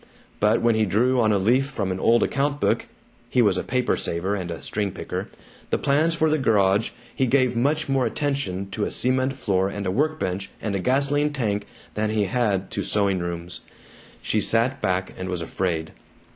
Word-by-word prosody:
But 105 +2 +3
when 120 -1 +4
he 110 0 +2
drew 125 +6 +2
on 110 -1 +3
a 105 - +3
leaf 120 +8 +2
from 100 -9 -3
an 95 - -3
old 115 +4 +4
account 140 +1 0
book - - +1 0.4
(he 125 - +1
was 100 -4 +3
a 90 - -1
paper 125 -1 0
saver 90 +4 -1
and 90 -4 -3
a 85 - -5
string 105 -2 -2
picker) - - -5 0.4
the - - +1
plans 155 +4 +2
for 160 -1 +2
the 155 0 +2
garage, 105 -3 +3 0.3
he 130 - +1
gave 130 -1 +2
much 145 +6 +1
more 135 -2 +2
attention 135 -10 -2
to 105 - -2
a - - 0
cement 130 +1 +1
floor 100 -8 0
and 100 0 -5
a 90 - 0
work 155 +8 0
bench 95 -3 -3
and 105 - -3
a - - 0
gasoline 140 +6 +2
tank 105 -7 -1 0.3
than 105 0 -1
he 110 -1 +1
had 100 -2 0
to - - -2
sewing 100 -3 +1
rooms. 85 0 -5 0.6
She 110 - +1
sat 115 +5 +2
back 95 -2 -1
and 95 0 -4
was 90 -2 -2
afraid. 80 -1 -2
110 Hz, 200 wpm, -24 LUFS, 95-130 Hz, 0.6 s, when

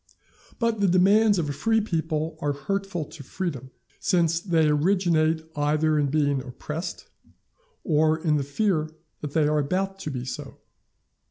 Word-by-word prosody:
But 230 -2 0
the 200 - +3
demands 200 +4 +4
of 165 -4 0
a 145 - -2
free 225 +9 +2
people 160 -5 -2
are 145 0 0
hurtful 195 +2 -3
to 155 +1 -12
freedom, 135 -4 -4 0.3
since 170 -4 +2
they 165 -4 +2
originate 160 0 +2
either 150 +1 +2
in 145 - +2
being 140 -1 +1
oppressed, 150 +6 -6 0.8
or 155 0 +3
in 155 -2 +1
the 140 - -1
fear 155 +1 0 0.3
that 150 -1 -6
they 155 -2 +3
are 150 0 +2
about 190 +6 -1
to 190 - -4
be 125 -3 -4
so. 130 - -7
160 Hz, 155 wpm, -25 LUFS, 150-185 Hz, 0.8 s, demands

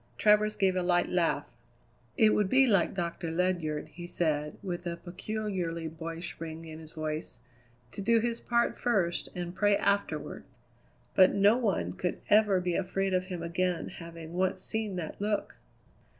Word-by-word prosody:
Travers 210 0 +4
gave 195 -3 +2
a 185 - +1
light 175 0 +2
laugh. 175 -2 0 0.6
"It 220 -3 +6
would 205 -2 +2
be 265 +3 +6
like 200 -6 +2
Doctor 170 -2 -3
Ledyard," 165 -3 -1
he 175 +2 -9
said 150 -4 -1
with 175 -2 -4
a 170 0 -3
peculiarly 180 -2 -3
boyish 165 +1 -6
ring 165 0 -6
in 160 -1 -8
his 160 0 -10
voice, 155 -5 -4 0.5
"to - - -6
do 230 +3 +4
his 235 0 -1
part 235 0 +1
first 190 -8 +1
and 175 -1 -4
pray 205 +1 +3
afterward." 200 -7 -1 0.7
"But 185 -1 +6
no 200 +2 +5
one 230 -6 0
could 180 -1 -2
ever 205 -2 +5
be 180 -1 -1
afraid 195 +1 0
of 185 0 +1
him 180 -3 -5
again 175 +1 -1
having 165 -1 -9
once 185 +1 0
seen 220 -3 -2
that 175 +1 -5
look!" 210 0 -1
180 Hz, 165 wpm, -30 LUFS, 165-205 Hz, 0.7 s, It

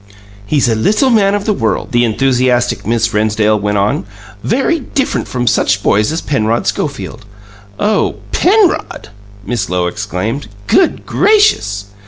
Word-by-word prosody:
"He's 140 +2 +1
a 115 - +2
little 210 - +2
man 205 -3 +3
of 205 - -3
the 215 - +1
world," 195 - -2
the 120 -1 +2
enthusiastic 125 0 0
Miss 115 0 0
Rennsdale 105 0 +1
went 105 0 -1
on, 100 0 0 0.4
"very 275 +8 0
different 270 0 -2
from 125 -1 -3
such 100 -2 +1
boys 105 +5 +2
as 160 - -2
Penrod 115 -5 -1
Schofield!" 130 -5 -4 0.6
"Oh, 210 0 +1 0.2
PENROD!" 385 - +1 0.4
Miss 115 -6 -2
Lowe 90 0 0
exclaimed. 105 +7 -4 0.2
"Good 360 - +1
gracious!" 405 - +2
120 Hz, 140 wpm, -14 LUFS, -, 0.6 s, man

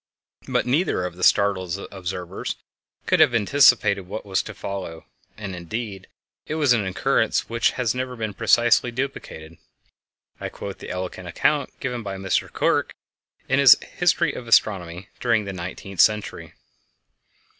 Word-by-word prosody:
But - - 0
neither 130 - +1
of 90 -1 -5
the 90 - -7
startled 95 -3 +2
observers 90 -2 -5 0.5
could - - +2
have 120 - +5
anticipated 105 -4 +4
what 105 +3 -6
was 95 -2 0
to - - -9
follow, 95 -5 -6 0.3
and, 100 -3 -6
indeed, 95 +2 -6 0.4
it 155 - -3
was 145 -5 +3
an 115 -4 +1
occurrence 95 - +1
which 115 0 +1
has 125 -4 0
never 125 0 -4
been 110 -3 -4
precisely 120 +2 +3
duplicated. 115 - -6 0.8
I - - -4
quote - - -8
the - - -9
eloquent 90 0 -5
account 140 - 0
given 125 -3 -3
by 100 -3 -5
Miss 95 0 +1
Clerke - - -1 0.5
in - - +2
her - - +3
_History - - +4
of 120 - -8
Astronomy 90 -5 +1
During 115 -4 +1
the 100 - -5
Nineteenth 95 +1 -7
Century. 105 -1 0
100 Hz, 145 wpm, -23 LUFS, 95-120 Hz, 0.8 s, have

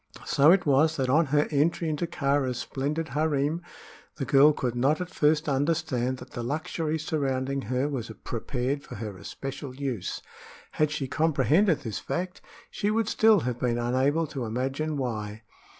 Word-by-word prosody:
So 145 +4 +5
it 185 +1 +4
was 155 +3 +3
that 130 -2 0
on 155 +2 +4
her 145 +2 +2
entry 160 +3 +1
into 155 +2 -1
Kāra's 140 -5 0
splendid 150 +6 -3
harem 150 +3 0 0.5
the 140 - -3
girl 140 +2 +6
could 125 -5 -2
not 135 +5 +2
at 180 0 -5
first 155 +1 +2
understand 140 -3 0
that 125 0 -12
the 120 - -5
luxury 155 +4 -2
surrounding 140 -3 -1
her 130 +2 +1
was 130 -6 -4
prepared 125 +4 -2
for - - -10
her 105 -2 -6
especial 135 +5 -7
use. 130 -8 -4 0.5
Had 155 -1 +1
she 150 -3 -3
comprehended 160 +5 +2
this 110 -7 -4
fact, 180 +1 -4 0.3
she 205 - -1
would 220 0 +1
still 220 -4 +5
have 125 -2 -3
been 120 -1 0
unable 130 +7 +1
to 140 -4 -5
imagine 135 +7 -2
why. 110 -4 -4
140 Hz, 165 wpm, -27 LUFS, 130-155 Hz, 0.5 s, girl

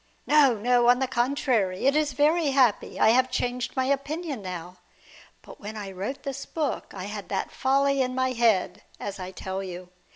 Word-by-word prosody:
No, 290 -5 +5
no; 240 +2 +3
on 245 - +6
the 265 - 0
contrary, 240 -7 0
it 275 +2 +4
is 300 -2 +1
very 305 +4 +2
happy. 260 -6 +2
I 220 - +5
have 255 +3 +4
changed 250 -1 -2
my 260 -1 +1
opinion 280 0 -2
now. 180 -1 -7 0.7
But - - -13
when 215 +1 -7
I 200 -2 -6
wrote 200 +9 -5
this 275 0 -5
book 305 -4 -3
I 185 - -6
had 205 0 -7
that - - -2
folly 275 +1 +2
in 255 0 -1
my 260 0 +1
head, 215 -6 +1 0.2
as 200 -1 -6
I 185 0 -5
tell 190 0 -5
you. 180 -1 -8
250 Hz, 190 wpm, -26 LUFS, 200-275 Hz, 0.7 s, on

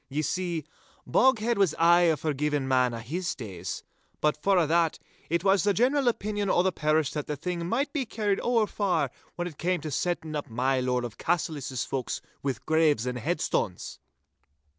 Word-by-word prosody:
Ye 150 +3 -1
see, 175 -3 -2 0.4
Boghead 235 -3 +3
was 195 -6 +3
aye 170 +1 +5
a 160 - +3
forgiein' 150 -1 -1
man 130 -2 +2
a' 115 -1 -5
his 170 +10 -3
days. 95 -8 -6 0.4
But 150 0 +2
for 195 -1 +3
a' 170 - +4
that, 165 +1 +2 0.3
it 170 +1 0
was 195 -2 +4
the 205 -1 +2
general 260 +5 +2
opinion 205 -3 0
o' 175 - +3
the 190 - +2
pairish 155 -3 +1
that 150 -2 -3
the 150 - -2
thing 170 +3 -3
might 275 +6 0
be 275 -6 -1
carried 210 -3 0
ower 235 -3 +2
far, 180 - 0 0.2
when 175 0 -2
it 155 -4 -10
cam' 180 +2 +1
to 155 0 -5
setting 160 +1 -2
up 145 - -4
my 130 +3 +1
Lord 125 -1 0
of 115 - -8
Cassillis's 145 -7 -1
folks 130 -3 -3 0.2
wi' 135 -2 -1
graves 155 -6 +3
and 125 -1 -2
headstones! - - -2
160 Hz, 185 wpm, -27 LUFS, 140-190 Hz, 0.4 s, aye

